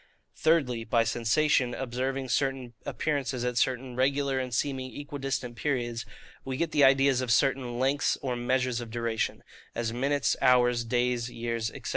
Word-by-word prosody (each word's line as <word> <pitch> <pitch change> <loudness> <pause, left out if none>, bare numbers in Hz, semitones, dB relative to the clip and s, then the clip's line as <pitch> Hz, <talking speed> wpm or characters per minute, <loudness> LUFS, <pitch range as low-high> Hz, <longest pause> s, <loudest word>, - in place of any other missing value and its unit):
Thirdly, 135 -8 +2
by 115 +1 +2
sensation 120 +3 +1
observing 130 +1 -3
certain 135 -2 -1
appearances, 140 -5 -1
at 125 -1 0
certain 125 0 -1
regular 135 +1 +1
and 130 -1 -3
seeming 130 +2 -2
equidistant 135 -4 -4
periods, 120 -5 -2 0.4
we 130 -1 -4
get 165 +1 -1
the 145 -2 +3
ideas 135 -1 +5
of 125 -2 -1
certain 130 -2 +2
LENGTHS 135 +3 +1
or 130 -2 -1
MEASURES 125 0 0
OF 120 - -7
DURATION, 115 -1 -2 0.3
as 115 -1 -2
minutes, 140 +3 +1
hours, 125 -1 +4
days, 120 0 0
years, 115 -1 -3
&c. - - -8
125 Hz, 150 wpm, -28 LUFS, 120-135 Hz, 0.4 s, ideas